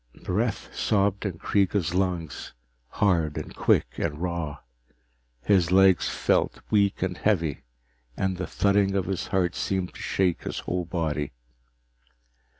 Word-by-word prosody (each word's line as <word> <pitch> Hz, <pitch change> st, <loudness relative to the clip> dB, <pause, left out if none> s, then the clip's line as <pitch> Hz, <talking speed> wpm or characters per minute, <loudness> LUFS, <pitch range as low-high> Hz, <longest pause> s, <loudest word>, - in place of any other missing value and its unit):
Breath 105 Hz, +4 st, -2 dB
sobbed 100 Hz, 0 st, +1 dB
in 95 Hz, -, -3 dB
Kreega's 95 Hz, -2 st, +1 dB
lungs, 90 Hz, -5 st, -2 dB, 0.3 s
hard 85 Hz, -1 st, +1 dB
and -, -, -6 dB
quick -, -, +1 dB
and 75 Hz, -3 st, -1 dB
raw. 85 Hz, -4 st, -3 dB, 0.9 s
His 90 Hz, -4 st, +3 dB
legs 95 Hz, -2 st, +5 dB
felt -, -, +1 dB
weak 100 Hz, -3 st, +2 dB
and 95 Hz, -1 st, -1 dB
heavy, 85 Hz, -9 st, +1 dB, 0.6 s
and 95 Hz, -1 st, -1 dB
the 90 Hz, -, -3 dB
thudding 100 Hz, -1 st, +2 dB
of 95 Hz, -2 st, +1 dB
his 95 Hz, -1 st, -3 dB
heart 90 Hz, -3 st, +1 dB
seemed 95 Hz, -2 st, -2 dB
to -, -, -10 dB
shake 90 Hz, -3 st, 0 dB
his -, -, -4 dB
whole 90 Hz, 0 st, -2 dB
body. 80 Hz, -5 st, -2 dB
90 Hz, 135 wpm, -26 LUFS, 85-100 Hz, 0.9 s, legs